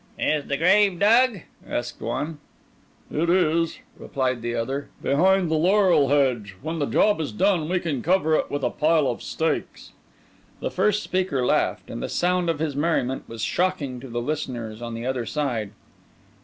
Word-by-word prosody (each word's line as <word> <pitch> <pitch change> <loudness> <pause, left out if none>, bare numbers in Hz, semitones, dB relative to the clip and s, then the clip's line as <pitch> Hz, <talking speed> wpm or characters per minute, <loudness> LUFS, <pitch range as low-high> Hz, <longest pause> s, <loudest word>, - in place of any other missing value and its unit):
"Is 150 -2 0
the 140 - -1
grave 190 +3 +4
dug?" 225 +1 +4 0.3
asked 120 0 -4
one. 145 +7 -3 0.7
"It 165 +3 0
is," 170 -1 +2 0.2
replied 130 -4 -2
the 120 0 -3
other; 135 +5 -3
"behind 180 +4 +3
the - - +3
laurel 180 -3 +4
hedge. 125 -9 +1
When 160 +1 -3
the 145 - 0
job 205 -6 +2
is 145 - -3
done, 160 - +1
we 185 0 +1
can 150 -8 -3
cover 170 -1 +2
it - - +1
with 145 -1 -3
a 125 - +1
pile 155 -1 +2
of 120 - -2
stakes." 160 0 -3 0.7
The - - -3
first 210 0 +1
speaker 180 -9 -1
laughed, - - 0
and - - -5
the - - -3
sound 180 0 +1
of 165 - 0
his 150 -2 -2
merriment 140 -4 0
was 115 -1 -6
shocking 165 -9 -1
to 135 - -9
the 120 -1 -3
listeners 120 -6 -4
on 115 -1 -5
the 115 +1 -5
other 125 -3 -2
side. 120 -9 -2
150 Hz, 175 wpm, -24 LUFS, 125-175 Hz, 0.7 s, grave